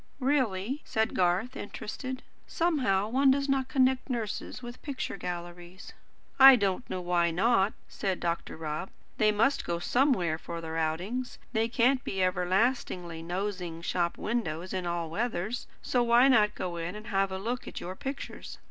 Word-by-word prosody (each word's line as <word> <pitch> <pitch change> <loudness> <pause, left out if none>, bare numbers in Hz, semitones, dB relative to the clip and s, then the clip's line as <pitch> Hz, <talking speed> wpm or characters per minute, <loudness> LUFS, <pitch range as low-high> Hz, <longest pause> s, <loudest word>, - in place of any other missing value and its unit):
"Really?" 255 -2 0
said 220 0 0
Garth, 185 +8 +1
interested. 255 +5 -6 0.2
"Somehow 255 - +1
one 265 +4 +3
does 275 +1 +2
not 270 -1 +1
connect 260 -1 +2
nurses 235 0 -4
with 240 0 -8
picture 280 -8 -4
galleries." 175 0 -7 0.5
"I 270 0 +11
don't 200 +1 -1
know 185 - -3
why 175 -1 +2
not," 195 +3 +2
said 190 -2 -2
Dr. 170 -1 -3
Rob. 155 +3 -4 0.3
"They 215 0 +5
must 230 +7 +2
go 170 - -2
somewhere 180 - +2
for 170 0 -6
their 160 -1 -6
outings. 180 +11 -2 0.2
They 225 0 +2
can't 245 +2 +2
be 190 -1 -1
everlastingly 185 -2 0
nosing 180 -1 -4
shop 175 -1 0
windows 185 -6 -2
in 185 -2 -2
all 170 -1 -1
weathers; 220 +2 -2 0.2
so 250 - +1
why 240 +2 +5
not 215 -5 +4
go 175 -2 -4
in 170 +3 -4
and 215 +1 -8
have 195 -2 +1
a 190 - -3
look 235 +6 -3
at - - -6
your 185 +2 -6
pictures? 270 +7 -6
200 Hz, 160 wpm, -29 LUFS, 175-250 Hz, 0.5 s, I